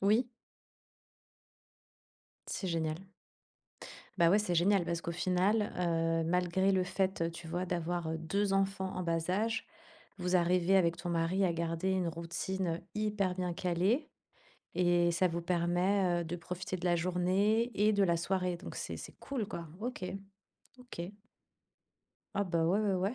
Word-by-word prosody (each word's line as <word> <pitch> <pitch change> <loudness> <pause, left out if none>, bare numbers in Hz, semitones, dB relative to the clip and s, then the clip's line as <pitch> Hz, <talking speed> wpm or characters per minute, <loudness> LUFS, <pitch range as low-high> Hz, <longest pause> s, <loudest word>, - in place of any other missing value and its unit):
Oui. 215 +5 +3 2.2
C'est 190 - -3
génial. 160 0 -1 1.2
Bah 170 -1 +6
ouais, 200 - +5
c'est 195 -5 0
génial 185 +1 +4
parce 170 -1 -2
qu'au 170 - -4
final, 185 +5 +1
heu, 165 -1 +1
malgré 180 +2 +2
le 185 -1 +2
fait, 190 -1 0
heu, 165 - 0
tu 170 0 -9
vois, 175 +2 -1
d'avoir, 175 -1 -2
heu, 160 - -2
2 195 +5 0
enfants 195 -1 0
en 185 - -2
bas 165 0 -1
âge, 220 +4 0 0.5
vous 180 0 +2
arrivez, 180 +2 +3
avec 170 -2 +3
ton 175 - -5
mari, 170 +3 +1
à 175 - +1
garder 165 +2 -1
une 185 -2 +1
routine, 170 +3 -3
heu, - - -10
hyper 210 -3 0
bien 180 -2 -2
calée. 185 - +1 0.6
Et 175 -1 +3
ça 185 +2 +3
vous 170 0 -2
permet, 175 +1 +1
heu, - - -6
de 165 +2 -4
profiter 180 +1 -4
de 180 - -8
la 175 -1 +3
journée 185 +7 +2
et 210 +1 +5
de 200 -1 +3
la 170 -3 +3
soirée. 180 +1 0
Donc 185 - -9
c'est - - -4
c'est - - -9
cool, 255 -7 -3
quoi. 170 -6 -6
OK, 240 -5 -4 0.7
OK. 220 -8 -7 1.2
Ah 200 - +1
bah, 170 -3 +1
ouais 185 +6 +3
ouais 205 -2 +1
ouais. 190 +5 0
180 Hz, 165 wpm, -33 LUFS, 170-195 Hz, 2.2 s, Bah